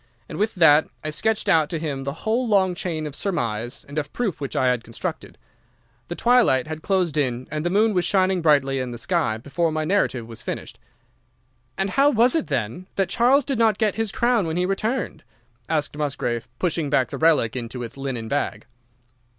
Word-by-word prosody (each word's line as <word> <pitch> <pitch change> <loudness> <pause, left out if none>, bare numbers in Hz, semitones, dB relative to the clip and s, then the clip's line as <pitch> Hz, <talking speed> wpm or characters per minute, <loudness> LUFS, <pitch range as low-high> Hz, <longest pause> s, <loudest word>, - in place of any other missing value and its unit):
And - - -7
with 215 +1 0
that 160 -3 +6 0.2
I 155 - -3
sketched 220 +8 -1
out 155 -2 +4
to 165 - -2
him 145 -4 -4
the 140 - -1
whole 235 +3 +1
long 190 -4 +3
chain 165 -3 -3
of 150 -2 -6
surmise 120 - -3
and 145 +2 -3
of 145 -1 -5
proof 210 -11 -2
which 140 - -4
I 130 -1 +3
had 125 -2 -2
constructed. 115 - -6 0.7
The 175 - -5
twilight 240 - +4
had 155 0 -6
closed 180 -4 0
in 130 -3 -1
and 155 0 -2
the 175 - 0
moon 210 +4 +3
was 180 -2 +1
shining 185 0 +2
brightly 140 -4 +3
in 130 -1 -3
the 120 - -6
sky 160 - 0
before 160 +8 -1
my 155 0 -1
narrative 155 - 0
was 115 0 -9
finished. - - -6 1.0
"'And 195 0 -1
how 275 +6 +4
was 245 -1 +4
it 320 - 0
then 135 - -3
that 195 -2 0
Charles 255 +3 +3
did 270 -5 -2
not 220 -3 +3
get 215 -3 +1
his 225 -2 -2
crown 235 -6 +1
when 160 +1 -2
he 180 - +1
returned?' 220 +7 -2 0.5
asked 150 -2 -1
Musgrave, 135 -5 -2
pushing 165 -4 -1
back 130 -3 +1
the - - -5
relic 155 -9 +3
into 120 0 -5
its 115 - -7
linen 135 -5 -4
bag. 145 +4 -2
160 Hz, 200 wpm, -23 LUFS, 135-200 Hz, 1.0 s, that